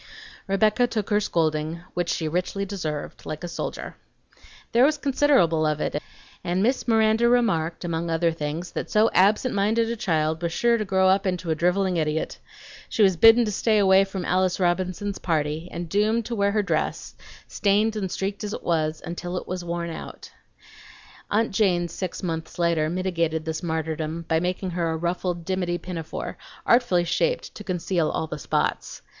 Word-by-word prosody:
Rebecca 215 Hz, +5 st, +3 dB
took 220 Hz, -3 st, -3 dB
her 205 Hz, -, +4 dB
scolding 160 Hz, -3 st, -1 dB
(which 175 Hz, -1 st, -1 dB
she 160 Hz, -, -1 dB
richly 185 Hz, +4 st, -2 dB
deserved) 160 Hz, -7 st, -5 dB
like 155 Hz, +2 st, -6 dB
a -, -, -3 dB
soldier. 170 Hz, -, -5 dB, 0.7 s
There 235 Hz, +2 st, +4 dB
was 300 Hz, +2 st, +4 dB
considerable 270 Hz, -, +3 dB
of 150 Hz, 0 st, 0 dB
it, 150 Hz, -, -2 dB, 0.4 s
and 180 Hz, +2 st, 0 dB
Miss 255 Hz, +4 st, +1 dB
Miranda 225 Hz, +1 st, +4 dB
remarked, 180 Hz, -10 st, +1 dB
among 170 Hz, 0 st, -2 dB
other 165 Hz, +1 st, +2 dB
things, 160 Hz, +2 st, -4 dB
that -, -, -4 dB
so 215 Hz, +1 st, +3 dB
absent 210 Hz, +7 st, +3 dB
minded 220 Hz, +3 st, +1 dB
a -, -, -2 dB
child 160 Hz, -7 st, 0 dB
was 170 Hz, -1 st, -1 dB
sure 235 Hz, +5 st, +2 dB
to 215 Hz, -, -1 dB
grow 190 Hz, -1 st, +3 dB
up 190 Hz, +1 st, +3 dB
into 180 Hz, -2 st, -2 dB
a -, -, +2 dB
driveling 180 Hz, +2 st, +1 dB
idiot. 155 Hz, 0 st, -1 dB, 0.5 s
She 220 Hz, -, +2 dB
was 190 Hz, -2 st, +4 dB
bidden 225 Hz, +6 st, +7 dB
to 210 Hz, -, -2 dB
stay 215 Hz, +2 st, +2 dB
away 195 Hz, -1 st, +5 dB
from 195 Hz, -2 st, -5 dB
Alice 185 Hz, 0 st, +1 dB
Robinson's 185 Hz, +2 st, -1 dB
birthday -, -, -32 dB
party, 155 Hz, 0 st, 0 dB
and 170 Hz, 0 st, -5 dB
doomed 215 Hz, +5 st, +1 dB
to 235 Hz, -, -3 dB
wear 200 Hz, -1 st, +2 dB
her 210 Hz, -1 st, +2 dB
dress, 200 Hz, -, -2 dB, 0.3 s
stained 210 Hz, +2 st, +1 dB
and 195 Hz, -4 st, -3 dB
streaked 195 Hz, +2 st, -3 dB
as 210 Hz, 0 st, -4 dB
it -, -, -6 dB
was, 155 Hz, -2 st, 0 dB
until 175 Hz, +2 st, -4 dB
it -, -, -6 dB
was 185 Hz, -1 st, -4 dB
worn 170 Hz, 0 st, -3 dB
out. -, -, -9 dB, 1.0 s
Aunt 225 Hz, +2 st, +1 dB
Jane 185 Hz, -4 st, +2 dB
six 180 Hz, +3 st, -5 dB
months 160 Hz, -2 st, -4 dB
later 170 Hz, -3 st, +1 dB
mitigated 170 Hz, -3 st, -1 dB
this 160 Hz, 0 st, -3 dB
martyrdom 160 Hz, 0 st, -3 dB
by 160 Hz, -, +2 dB
making 180 Hz, +2 st, -2 dB
her 170 Hz, -1 st, -1 dB
a 160 Hz, -, -1 dB
ruffled 175 Hz, 0 st, -2 dB
dimity 180 Hz, -2 st, -1 dB
pinafore, 170 Hz, -3 st, -6 dB, 0.3 s
artfully 235 Hz, -8 st, +4 dB
shaped -, -, -1 dB
to 210 Hz, -, -9 dB
conceal 180 Hz, -3 st, -1 dB
all 160 Hz, -, -2 dB
the 155 Hz, -, -6 dB
spots. -, -, -2 dB
180 Hz, 180 wpm, -24 LUFS, 165-205 Hz, 1.0 s, bidden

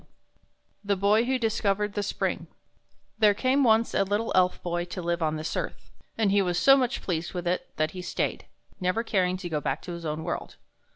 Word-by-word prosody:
22 -, -, -31 dB, 0.7 s
The 200 Hz, -, +3 dB
Boy 205 Hz, +4 st, +3 dB
Who 260 Hz, +1 st, +1 dB
Discovered 210 Hz, -3 st, 0 dB
the 205 Hz, -, -1 dB
Spring 205 Hz, -, -2 dB
T -, -, -35 dB, 0.8 s
HERE 205 Hz, -, +4 dB
came 260 Hz, +5 st, +2 dB
once 225 Hz, -1 st, +3 dB
a -, -, +3 dB
little 205 Hz, +3 st, -1 dB
Elf 180 Hz, 0 st, +3 dB
Boy 175 Hz, 0 st, -1 dB
to 180 Hz, +1 st, -7 dB
live 170 Hz, 0 st, -1 dB
on 155 Hz, -1 st, +1 dB
this 155 Hz, +1 st, -4 dB
earth, -, -, -5 dB, 0.3 s
and 215 Hz, -3 st, +2 dB
he 200 Hz, 0 st, +4 dB
was 180 Hz, -2 st, 0 dB
so 270 Hz, +9 st, +7 dB
much 260 Hz, -1 st, 0 dB
pleased 175 Hz, 0 st, -3 dB
with 175 Hz, -1 st, -3 dB
it 180 Hz, +1 st, -1 dB
that 155 Hz, 0 st, +1 dB
he 185 Hz, -, -7 dB
stayed, 175 Hz, -, -2 dB, 0.3 s
never 185 Hz, +5 st, 0 dB
caring 185 Hz, -5 st, +1 dB
to 185 Hz, -1 st, -6 dB
go 155 Hz, -3 st, -2 dB
back -, -, -1 dB
to -, -, -6 dB
his 170 Hz, 0 st, -7 dB
own 155 Hz, 0 st, -3 dB
world. -, -, -4 dB
190 Hz, 220 wpm, -27 LUFS, 175-220 Hz, 0.8 s, so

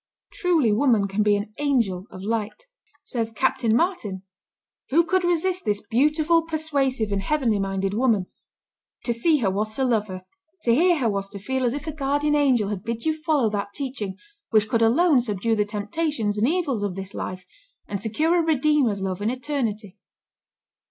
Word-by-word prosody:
Truly 340 Hz, -, +2 dB
woman 225 Hz, -4 st, +3 dB
can 195 Hz, +2 st, -1 dB
be 210 Hz, -1 st, +4 dB
an 205 Hz, +1 st, -4 dB
angel 230 Hz, -10 st, 0 dB
of 185 Hz, -, -10 dB
light. 220 Hz, -, -3 dB, 0.4 s
Says 230 Hz, -5 st, -3 dB
Captain 230 Hz, -1 st, +1 dB
Martin, 225 Hz, -, -1 dB, 0.7 s
"Who 330 Hz, +5 st, +4 dB
could 375 Hz, +1 st, +1 dB
resist 350 Hz, +1 st, 0 dB
this 210 Hz, 0 st, -1 dB
beautiful, 305 Hz, +8 st, +3 dB
persuasive, 285 Hz, -8 st, -1 dB
and 200 Hz, -1 st, 0 dB
heavenly 235 Hz, -2 st, +1 dB
minded 195 Hz, 0 st, -1 dB
woman? 220 Hz, -4 st, +2 dB, 0.8 s
To 235 Hz, -, 0 dB
see 300 Hz, +7 st, +3 dB
her 190 Hz, -, +2 dB
was 215 Hz, +3 st, -2 dB
to 265 Hz, -, 0 dB
love 220 Hz, -4 st, +1 dB
her; 185 Hz, -1 st, -7 dB, 0.4 s
to 235 Hz, -, +3 dB
hear 345 Hz, +6 st, +4 dB
her 255 Hz, -5 st, +1 dB
was 200 Hz, -2 st, -2 dB
to 200 Hz, -, -8 dB
feel 260 Hz, +6 st, -2 dB
as 245 Hz, +2 st, 0 dB
if 290 Hz, -, -6 dB
a 315 Hz, -, -3 dB
guardian 290 Hz, 0 st, 0 dB
angel 260 Hz, -8 st, +3 dB
had 200 Hz, -3 st, -4 dB
bid 230 Hz, +2 st, -4 dB
you 315 Hz, -1 st, +1 dB
follow 310 Hz, -8 st, +1 dB
that 200 Hz, -1 st, -4 dB
teaching 250 Hz, -9 st, -4 dB, 0.3 s
which 215 Hz, -1 st, +3 dB
could 230 Hz, +1 st, +1 dB
alone 270 Hz, +5 st, +4 dB
subdue 225 Hz, 0 st, -1 dB
the 210 Hz, -1 st, +1 dB
temptations 215 Hz, +2 st, -2 dB
and 210 Hz, +3 st, +2 dB
evils 300 Hz, -, 0 dB
of 200 Hz, -3 st, -2 dB
this 195 Hz, 0 st, -7 dB
life, 185 Hz, 0 st, -5 dB, 0.4 s
and 200 Hz, -1 st, -4 dB
secure 310 Hz, +11 st, +1 dB
a -, -, +4 dB
Redeemer's 295 Hz, -9 st, +2 dB
love 190 Hz, 0 st, -3 dB
in 210 Hz, -, +1 dB
eternity." 230 Hz, -6 st, -3 dB
230 Hz, 180 wpm, -24 LUFS, 205-295 Hz, 0.8 s, be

